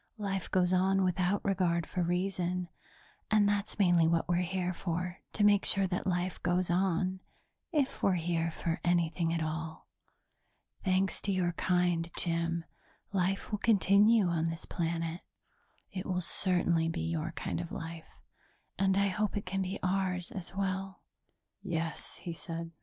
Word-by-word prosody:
Life 195 Hz, -3 st, -3 dB
goes 185 Hz, -1 st, +2 dB
on 190 Hz, +1 st, +3 dB
without 185 Hz, +2 st, +1 dB
regard 175 Hz, -4 st, +1 dB
for 180 Hz, -, -3 dB
reason, 180 Hz, 0 st, -1 dB, 0.6 s
and 215 Hz, -2 st, +4 dB
that's 205 Hz, 0 st, -1 dB
mainly 175 Hz, -5 st, +4 dB
what 165 Hz, 0 st, +1 dB
we're 175 Hz, 0 st, +2 dB
here 180 Hz, 0 st, -1 dB
for, 180 Hz, +1 st, -3 dB
to 210 Hz, -, +1 dB
make 205 Hz, -1 st, +5 dB
sure 195 Hz, -1 st, +5 dB
that 180 Hz, 0 st, -2 dB
life 180 Hz, 0 st, -1 dB
goes 180 Hz, 0 st, +1 dB
on 185 Hz, +1 st, +1 dB, 0.5 s
if 290 Hz, -5 st, 0 dB
we're 195 Hz, -, +3 dB
here 165 Hz, -1 st, 0 dB
for 165 Hz, +1 st, -3 dB
anything 170 Hz, -1 st, +1 dB
at 165 Hz, -1 st, 0 dB
all. 160 Hz, 0 st, -5 dB, 1.0 s
Thanks 190 Hz, 0 st, +1 dB
to 200 Hz, -, -1 dB
your 180 Hz, -2 st, +1 dB
kind, 175 Hz, -1 st, +1 dB
Jim, 170 Hz, -1 st, -1 dB, 0.5 s
life 195 Hz, +2 st, 0 dB
will 210 Hz, -, -1 dB
continue 210 Hz, 0 st, +5 dB
on 170 Hz, -2 st, +1 dB
this 165 Hz, 0 st, -4 dB
planet; 165 Hz, 0 st, -2 dB, 0.7 s
it 185 Hz, -1 st, -5 dB
will 180 Hz, -1 st, 0 dB
certainly 175 Hz, -2 st, +2 dB
be 165 Hz, +1 st, -3 dB
your 165 Hz, 0 st, -2 dB
kind 165 Hz, -, -3 dB
of 170 Hz, -, -7 dB
life 165 Hz, 0 st, -8 dB, 0.6 s
and 190 Hz, 0 st, +3 dB
I 200 Hz, 0 st, +3 dB
hope 210 Hz, +1 st, -1 dB
it 205 Hz, -, -4 dB
can 195 Hz, +1 st, -2 dB
be 190 Hz, +1 st, -2 dB
ours 185 Hz, -1 st, 0 dB
as 190 Hz, -1 st, -7 dB
well." 190 Hz, 0 st, -3 dB, 0.6 s
"Yes," 165 Hz, -4 st, -3 dB
he 170 Hz, -, -6 dB
said. 165 Hz, 0 st, -6 dB
180 Hz, 155 wpm, -31 LUFS, 170-195 Hz, 1.0 s, make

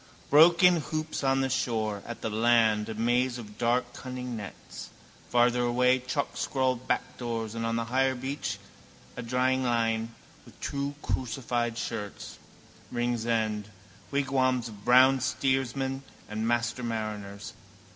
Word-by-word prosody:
Broken 170 Hz, +4 st, +7 dB
hoops 155 Hz, -1 st, -3 dB
on 135 Hz, 0 st, +3 dB
the 135 Hz, -, 0 dB
shore; 110 Hz, -5 st, -1 dB
at 115 Hz, -, -7 dB
the -, -, -2 dB
land 110 Hz, -1 st, +3 dB
a 110 Hz, -, -4 dB
maze 120 Hz, +3 st, +1 dB
of 105 Hz, -3 st, -10 dB
dark 120 Hz, +1 st, +1 dB
cunning 125 Hz, -1 st, -6 dB
nets; 105 Hz, -3 st, -8 dB, 0.4 s
farther 120 Hz, 0 st, +3 dB
away 125 Hz, +1 st, +3 dB
chalkscrawled 130 Hz, -1 st, -1 dB
backdoors 115 Hz, -3 st, -2 dB
and 115 Hz, 0 st, -2 dB
on 115 Hz, -, 0 dB
the 115 Hz, 0 st, -1 dB
higher 130 Hz, +2 st, +1 dB
beach 130 Hz, -5 st, -3 dB, 0.6 s
a -, -, -5 dB
dryingline 120 Hz, -2 st, +1 dB, 0.4 s
with -, -, -18 dB
two 140 Hz, 0 st, -3 dB
crucified 120 Hz, -2 st, -2 dB
shirts. 105 Hz, -4 st, -5 dB, 0.5 s
Ringsend: 115 Hz, -3 st, -1 dB, 0.4 s
wigwams 130 Hz, -3 st, +1 dB
of 105 Hz, -2 st, -12 dB
brown 130 Hz, +3 st, +6 dB
steersmen 135 Hz, +1 st, 0 dB, 0.3 s
and 110 Hz, +1 st, -3 dB
master 120 Hz, +1 st, 0 dB
mariners. 105 Hz, -3 st, -4 dB
120 Hz, 125 wpm, -28 LUFS, 115-130 Hz, 0.6 s, Broken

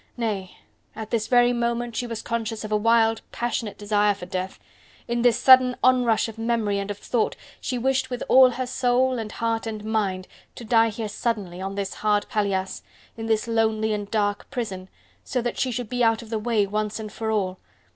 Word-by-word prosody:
Nay! 205 Hz, -6 st, -3 dB, 0.4 s
at 220 Hz, -1 st, -7 dB
this 220 Hz, -2 st, 0 dB
very 245 Hz, 0 st, +4 dB
moment 235 Hz, 0 st, -1 dB
she 245 Hz, -, -2 dB
was 230 Hz, -2 st, -5 dB
conscious 225 Hz, -1 st, -3 dB
of 215 Hz, -, -6 dB
a -, -, +3 dB
wild 225 Hz, +1 st, +3 dB
passionate 235 Hz, -3 st, -3 dB
desire 205 Hz, 0 st, +2 dB
for 185 Hz, -, -8 dB
death.... 185 Hz, +1 st, -4 dB, 0.5 s
In 235 Hz, 0 st, -1 dB
this 240 Hz, -2 st, +4 dB
sudden 255 Hz, -1 st, +6 dB
onrush 250 Hz, -4 st, +3 dB
of 225 Hz, 0 st, -9 dB
memory 225 Hz, -3 st, 0 dB
and 200 Hz, 0 st, -4 dB
of 205 Hz, -, -4 dB
thought 230 Hz, +2 st, -1 dB, 0.2 s
she 250 Hz, -, -3 dB
wished 260 Hz, +1 st, 0 dB
with 250 Hz, -1 st, -4 dB
all 260 Hz, 0 st, +7 dB
her 255 Hz, +1 st, -3 dB
soul 250 Hz, 0 st, +1 dB
and 215 Hz, -2 st, -5 dB
heart 225 Hz, 0 st, -2 dB
and 215 Hz, -1 st, -5 dB
mind 200 Hz, -4 st, -1 dB, 0.3 s
to 235 Hz, -, -9 dB
die 225 Hz, 0 st, +4 dB
here 220 Hz, 0 st, -4 dB
suddenly, 205 Hz, -4 st, -3 dB
on 195 Hz, +1 st, -4 dB
this 200 Hz, -1 st, -3 dB
hard 210 Hz, -1 st, +1 dB
paillasse, 195 Hz, -3 st, -1 dB, 0.3 s
in 225 Hz, 0 st, -5 dB
this 220 Hz, 0 st, +1 dB
lonely 220 Hz, -1 st, +1 dB
and 205 Hz, -1 st, -4 dB
dark 205 Hz, -2 st, -1 dB
prison... 190 Hz, -6 st, -5 dB, 0.3 s
so 255 Hz, -, -2 dB
that 240 Hz, 0 st, -3 dB
she 260 Hz, -, +1 dB
should 245 Hz, -1 st, -3 dB
be 245 Hz, +2 st, -1 dB
out 225 Hz, 0 st, +2 dB
of 225 Hz, -, -13 dB
the 220 Hz, -, -1 dB
way 215 Hz, -2 st, +1 dB
once 210 Hz, +2 st, -2 dB
and 215 Hz, -1 st, -7 dB
for 220 Hz, -1 st, -3 dB
all... 190 Hz, -4 st, -1 dB
225 Hz, 205 wpm, -24 LUFS, 210-240 Hz, 0.5 s, all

